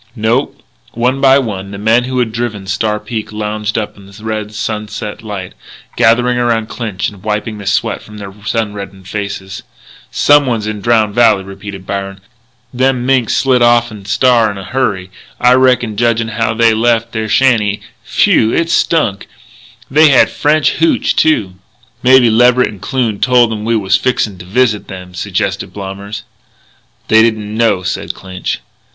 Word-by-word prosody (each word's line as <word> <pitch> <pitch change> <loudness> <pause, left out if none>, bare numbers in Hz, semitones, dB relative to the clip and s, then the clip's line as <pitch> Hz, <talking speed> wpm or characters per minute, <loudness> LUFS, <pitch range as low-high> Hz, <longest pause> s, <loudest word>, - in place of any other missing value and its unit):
"No." 115 +4 0 0.4
One 125 +4 0
by 135 0 +6
one 100 -7 -3
the 100 - -7
men 110 +4 +2
who 130 0 -3
had 120 -3 0
driven 110 -4 -4
Star 105 +2 -1
Peak 110 -2 -5
lounged 105 0 -3
up 110 -2 -3
in 100 -1 -15
the 100 +2 -14
red 110 -1 -4
sunset 105 -1 -5
light, 100 -4 -7 0.4
gathering 120 +2 +3
around 115 -2 0
Clinch 105 -4 -3
and 100 -2 -15
wiping 105 +1 -3
the 100 - -8
sweat - - 0
from 105 - -13 0.3
sun 110 -3 -1
reddened 100 -2 -9
faces. 100 -1 -5 0.5
"Someone's 130 -7 +3
in 105 -1 -4
Drowned 110 -2 +2
Valley," 105 -4 +4
repeated 95 0 -9
Byron. 100 0 -4 0.5
"Them 125 0 +1
minks 130 -4 +2
slid 130 -2 +2
off'n 120 -4 +2
Star 120 0 +3
in 100 - -6
a 95 - -7
hurry, 100 -6 -2 0.3
I 125 +1 +5
reckon, 125 -4 +2
judgin' 115 0 +1
how 110 0 -1
they 115 0 +4
left 115 0 +1
their 110 -1 -3
shanty. 110 -6 +2 0.2
Phew! 110 - +2
It 165 +5 0
stunk! 115 -12 +1 0.6
They 155 +2 +6
had 135 - +4
French 150 +1 +1
hootch, 315 -6 +2
too." 100 -13 +1 0.4
"Mebby 125 -2 +5
Leverett 125 +2 +4
and 100 -3 -11
Kloon 120 -6 -1
told 120 -3 +3
'em 105 -1 -5
we 115 0 +1
was 100 -2 +2
fixin' 105 -4 -1
to 85 - -10
visit 105 +1 0
them," 90 -1 -9
suggested 90 - -3
Blommers. 100 +2 -7 0.8
"They 110 0 +5
didn't 110 -2 0
know," 110 -5 +1
said 90 - -3
Clinch. 95 -1 -5
110 Hz, 160 wpm, -14 LUFS, 100-120 Hz, 0.8 s, by